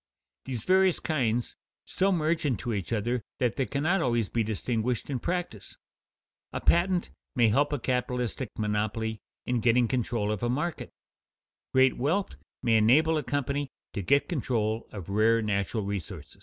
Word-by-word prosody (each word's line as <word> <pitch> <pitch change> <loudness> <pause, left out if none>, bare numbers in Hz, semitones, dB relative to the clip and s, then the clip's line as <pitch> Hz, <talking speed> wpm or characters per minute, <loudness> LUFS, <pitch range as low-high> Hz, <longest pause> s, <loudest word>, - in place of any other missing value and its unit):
These 120 -4 -4
various 190 -1 +4
kinds 120 -6 -1 0.3
so 195 +1 +1
merge 165 -2 +1
into 125 -4 -1
each 100 -2 -3
other 120 +2 0 0.2
that 125 -3 0
they 135 - -1
cannot 160 +7 +1
always 120 -6 +1
be 115 - 0
distinguished 115 +4 -2
in 130 - -1
practice. 175 - -4 0.7
A - - -3
patent 175 +1 +2 0.2
may 120 -3 +4
help 145 +7 +2
a 145 - 0
capitalistic 125 -1 -2
monopoly 110 +1 -1 0.3
in 125 -1 0
getting 120 +1 +3
control 115 -4 -1
of 105 - -3
a 120 - 0
market; 150 +7 -2 0.8
great 130 0 +4
wealth 170 +10 0 0.3
may 115 -2 +4
enable 145 +9 +4
a 155 - +1
company 145 0 -1 0.2
to 100 - -2
get 140 +9 +3
control 115 - -1
of 100 -6 -8
rare 110 +3 +3
natural 105 0 -1
resources. 100 -4 -6
120 Hz, 155 wpm, -28 LUFS, 110-145 Hz, 0.8 s, various